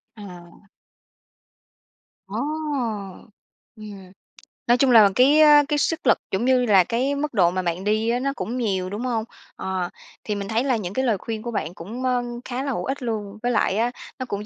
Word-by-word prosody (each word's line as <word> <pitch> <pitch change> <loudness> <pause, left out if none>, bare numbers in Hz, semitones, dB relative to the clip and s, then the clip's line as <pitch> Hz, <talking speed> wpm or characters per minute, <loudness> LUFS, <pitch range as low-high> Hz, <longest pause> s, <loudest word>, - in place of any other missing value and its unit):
À. 180 -2 -13 1.6
Ồ! 205 - -7 1.4
Ừm. 200 -4 -11 0.6
Nói 240 +1 +5
chung 260 0 +3
là 215 -4 +8
cái, 275 +5 +5
ơ, 295 -1 +7
cái 295 -1 0
sức 320 +2 -1
lực - - +5
cũng 195 +6 0
như 255 -1 +3
là 195 -5 +5
cái 255 +8 -1
mức 290 -1 -3
độ 175 -5 +3
mà 185 +1 -1
bạn 175 +1 -3
đi 215 +2 +1
á 240 - +1
nó 275 +2 -1
cũng 245 +3 -4
nhiều, 190 -6 -1
đúng 205 +4 -5
hông? 230 -3 -1 0.3
Ờ. 185 -2 -3 0.3
Thì 210 - -3
mình 200 -1 -5
thấy 225 +3 0
là 265 -2 +1
những 190 -3 -5
cái 260 +4 0
lời 225 -5 +2
khuyên 220 +3 -5
của 235 - -5
bạn 175 -6 -3
cũng, 220 +10 -8
ơ, 250 -1 +1 0.2
khá 255 +1 -4
là 275 - -2
hữu - - -3
ích 275 +1 -3
luôn, 215 -3 -4
với 245 - +1
lại 210 -3 +1
á, 235 +2 +1 0.3
nó 255 - -3
cũng 205 -3 -5
225 Hz, 205 wpm, -23 LUFS, 200-255 Hz, 1.6 s, là